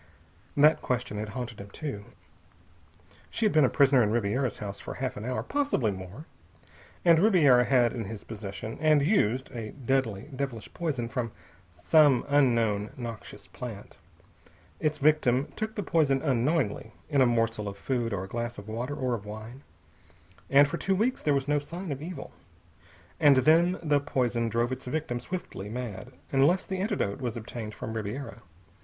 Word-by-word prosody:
That 150 +2 +5
question 125 -4 -2
had 105 0 -4
haunted 115 -4 -5
him 100 - -10
too. 105 -4 -6 1.2
She 225 - -1
had 210 - +3
been 155 -1 +5
a 130 - +4
prisoner 135 -3 +4
in 105 - +2
Ribiera's 115 +2 0
house 100 -2 -6
for - - -7
half 130 0 -3
an 105 - -6
hour, 125 0 -2
possibly 280 - 0
more. 95 - -8 0.8
And 165 -2 +6
Ribiera 155 - +5
had 125 -3 +3
in 115 -4 -4
his 105 0 -7
possession, 110 0 -7
and 155 -2 +4
used, 130 - +1
a 115 -4 -6
deadly, 130 -6 -1
devilish 130 -5 -5
poison 140 -9 -2
from 115 0 -3 0.4
some 135 - +4
unknown 115 -7 +2
noxious 115 -3 -8
plant. 115 -5 -9 0.8
Its 155 0 0
victim 145 -3 +2
took 220 0 -4
the 205 - -2
poison 150 -6 +2
unknowingly, 130 -4 0
in 145 -3 +2
a 130 - +6
morsel 115 -2 0
of 100 0 -6
food 120 0 -1
or 95 -3 -2
a - - -7
glass 120 +3 -4
of 105 - -9
water 120 +6 -4
or 130 -3 -1
of 105 -3 -5
wine. 110 +5 -8 0.9
And 140 +1 +6
for 170 - -3
two 195 +2 0
weeks 235 +6 0
there 145 -2 +2
was 135 0 -1
no 145 0 +2
sign 170 +4 -6
of 140 0 -4
evil. 165 -3 -7 0.9
And 140 -2 +6
then 170 +3 +5
the 145 -2 +3
poison 120 -4 0
drove 120 +3 0
its 130 +1 -5
victim 125 -2 -2
swiftly 125 - -6
mad 120 0 -6 0.2
unless 145 +7 +3
the 190 -1 -4
antidote 135 - -1
was 120 -3 -3
obtained 110 -1 -7
from 110 - -6
Ribiera. 110 +1 -5
125 Hz, 170 wpm, -28 LUFS, 110-145 Hz, 1.2 s, And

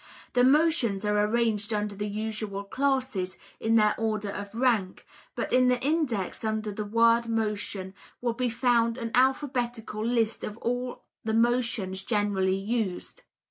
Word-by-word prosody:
The 245 - +4
motions 260 -8 +3
are 210 0 +2
arranged 225 -2 0
under 210 -1 -1
the 205 +1 -4
usual 210 -1 -4
classes, 260 -6 -1 0.2
in 225 0 +2
their 210 -1 +5
order 215 -2 -1
of 205 +1 -7
rank, 230 -7 +1 0.3
but - - -3
in 255 0 +5
the 250 -1 +3
index 265 - -1
under 220 -1 -1
the 210 +1 -4
word 230 +2 +3
motion 210 -4 -2 0.3
will 240 -1 -1
be 250 +1 -1
found 235 0 +2
an 230 -2 -4
alphabetical 245 -4 0
list 230 -1 0
of 210 - -5
all 245 +1 -3 0.2
the 220 0 0
motions 230 -5 +1
generally 200 -3 +1
used. 200 -2 -3
225 Hz, 145 wpm, -27 LUFS, 205-245 Hz, 0.3 s, their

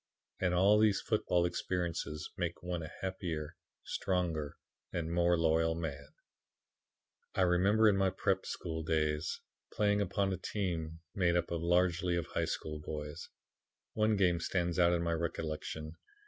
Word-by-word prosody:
And 90 -1 +1
all 100 +4 +5
these 105 -3 +4
football 90 -5 +1
experiences 85 -3 -2
make 85 0 -3
one 90 -1 -2
a 80 - -7
happier, 85 -5 -3 0.3
stronger 85 -6 -1 0.3
and 85 -1 -2
more 85 0 +3
loyal 80 0 +2
man. 70 -4 -5 1.3
"I - - +2
remember 95 +5 +4
in 100 -2 +4
my 95 -1 +3
prep. 95 0 0
school 80 -2 -4
days 75 -1 0 0.3
playing 105 -1 +2
upon 100 0 0
a - - -2
team 85 -4 -3
made 90 -3 +2
up 85 0 0
largely 85 +1 +2
of 85 -2 -1
high - - -1
school 75 -1 -4
boys. 75 -1 -6 0.6
One 110 0 +2
game 90 -4 +3
stands 85 0 -1
out 85 -1 +5
in 85 -1 +1
my 85 0 0
recollection. 80 -1 -4
85 Hz, 145 wpm, -33 LUFS, 80-95 Hz, 1.3 s, all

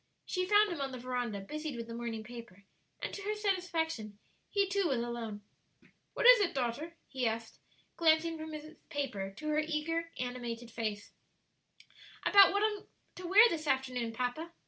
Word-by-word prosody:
She 365 -1 -1
found 415 0 +5
him 330 -5 -3
on 270 -1 -2
the 255 - -6
veranda, 245 -4 -3
busied 305 +6 -5
with 230 -1 -5
the 230 - -8
morning 230 -2 -4
paper, 230 -4 -11 0.4
and - - -3
to 405 - -5
her 420 +2 -2
satisfaction, 330 - -1 0.3
he 400 -1 +2
too 390 -1 +1
was 270 -5 +1
alone. 230 -3 -4 0.7
"What - - -1
is - - +10
it, 395 -7 +1
daughter?" 270 +7 -2
he 260 -3 -1
asked, 225 0 -4 0.4
glancing 325 0 +3
from 315 0 -7
his 305 +1 -8
paper 235 -10 -3
to 305 - -6
her 305 0 +2
animated, 300 -7 -3
eager - - -18
face. 215 -3 -3 1.1
"About 400 -1 +8
what 405 +2 +1
I 430 -1 +2
am - - -21 0.3
to 360 -1 -6
wear 415 +6 +8
this 310 -4 -3
afternoon, 255 -4 0
papa. 255 +8 -3
290 Hz, 175 wpm, -33 LUFS, 235-340 Hz, 1.1 s, is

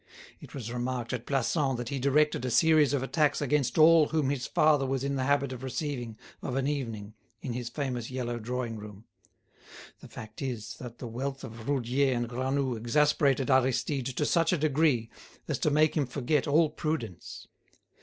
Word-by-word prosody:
It - - -12
was 120 -3 -5
remarked 125 0 -3
at 120 -2 -5
Plassans 135 0 0
that 120 -1 -5
he 140 - -3
directed 140 +1 +2
a 130 - -1
series 155 +2 +4
of 140 -2 0
attacks 150 +2 +1
against 145 -1 0
all 160 -1 +7
whom 150 -3 0
his 135 -2 -3
father 150 -2 +3
was 135 0 -1
in 140 0 -1
the 130 -1 -1
habit 140 -1 +1
of 125 - -8
receiving 130 -4 -4 0.2
of 130 - -4
an 135 0 0
evening 115 -8 -4 0.3
in 125 - -3
his 120 -1 -4
famous 125 -3 -3
yellow 120 -2 -3
drawing 120 0 -3
room. 105 0 -11 0.9
The - - -12
fact 110 0 -10
is 115 -5 -4
that 120 -2 -9
the - - -7
wealth 135 +4 -4
of 115 +2 -8
Roudier 135 0 +1
and 120 0 -1
Granoux 130 +1 -1
exasperated 140 +3 +2
Aristide 130 +1 +1
to 135 +3 -1
such 165 0 +2
a 180 - +2
degree 145 -6 +1 0.4
as - - -2
to - - +2
make 155 +1 +3
him 145 -5 +1
forget 130 +3 0
all 155 +2 +3
prudence. 150 - -5
130 Hz, 185 wpm, -29 LUFS, 120-145 Hz, 0.9 s, all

